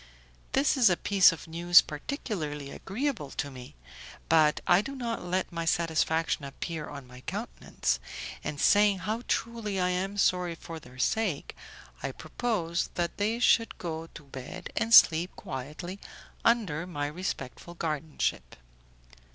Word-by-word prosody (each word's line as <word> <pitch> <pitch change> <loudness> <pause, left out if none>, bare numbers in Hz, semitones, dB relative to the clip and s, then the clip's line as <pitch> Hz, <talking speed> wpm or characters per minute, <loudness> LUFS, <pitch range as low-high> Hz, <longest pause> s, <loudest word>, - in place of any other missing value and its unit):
This 275 +1 +3
is 245 -6 +6
a 175 - +2
piece 195 -2 +5
of 165 - -8
news 170 +2 +6
particularly 150 - -4
agreeable 220 - -3
to 145 - -2
me, 125 - -11 0.5
but 155 -2 +5
I 175 +2 +5
do 275 +5 -6
not 235 -5 -3
let 180 +1 -1
my 170 -1 -3
satisfaction 165 -1 +1
appear 150 +3 -5
on 140 -2 -8
my 125 0 -13
countenance, - - -2 0.4
and 145 - -4
saying 205 +2 +5
how 220 +3 -1
truly 225 -4 -1
I 180 0 +2
am 190 +3 -2
sorry 180 -3 +2
for 165 0 -8
their 125 -3 -15
sake, 190 - 0 0.5
I - - -3
propose 180 -8 -2
that 170 -1 -2
they 215 +3 0
should 235 -1 +3
go 165 -1 -5
to 150 - -10
bed 135 -2 -8
and 225 - 0
sleep 175 -4 +7
quietly 150 +8 -6 0.4
under 185 -9 +2
my 145 -5 -3
respectful 170 0 -5
guardianship. 155 - -2
170 Hz, 145 wpm, -29 LUFS, 150-205 Hz, 0.5 s, sleep